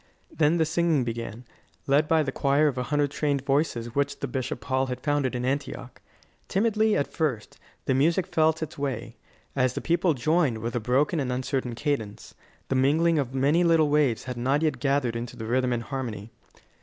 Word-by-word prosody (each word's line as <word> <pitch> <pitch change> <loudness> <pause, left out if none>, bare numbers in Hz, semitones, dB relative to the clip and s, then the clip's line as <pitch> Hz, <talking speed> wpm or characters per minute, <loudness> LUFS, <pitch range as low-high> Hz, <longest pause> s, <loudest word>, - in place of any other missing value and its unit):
Then 155 +2 +2
the 160 - +3
singing 160 -3 +1
began, 115 0 -5 0.4
led 145 +3 +3
by 160 -1 +3
the 135 - -3
choir 140 +3 +2
of 140 - 0
a 125 - -4
hundred 145 -1 +1
trained 140 -3 -1
voices 135 -5 0
which 140 +1 0
the 140 - -3
Bishop 130 0 -3
Paul 130 0 -1
had 125 -1 -4
founded 145 -3 0
in 125 0 -2
Antioch. 135 -2 -4 0.5
Timidly, 215 +1 +2
at 140 - +1
first, 140 -10 -2 0.3
the - - +2
music 165 +7 +2
felt 160 0 +1
its 150 - -8
way, 125 -4 -3 0.4
as 130 -2 +2
the - - -3
people 170 -1 +1
joined 145 -1 +1
with 115 +3 -4
a - - +1
broken 135 +8 +1
and 130 -3 -1
uncertain 125 -1 -2
cadence: 115 -6 -3 0.3
the - - -1
mingling 155 +5 +3
of 130 -2 -3
many 145 +6 +3
little 165 -3 +4
waves 145 -6 +2
not 135 +6 0
yet 155 - 0
gathered 135 -4 0
into 115 +1 -5
rhythm 125 +2 +1
and 120 -1 -1
harmony. 115 -5 -5
140 Hz, 185 wpm, -26 LUFS, 125-155 Hz, 0.5 s, little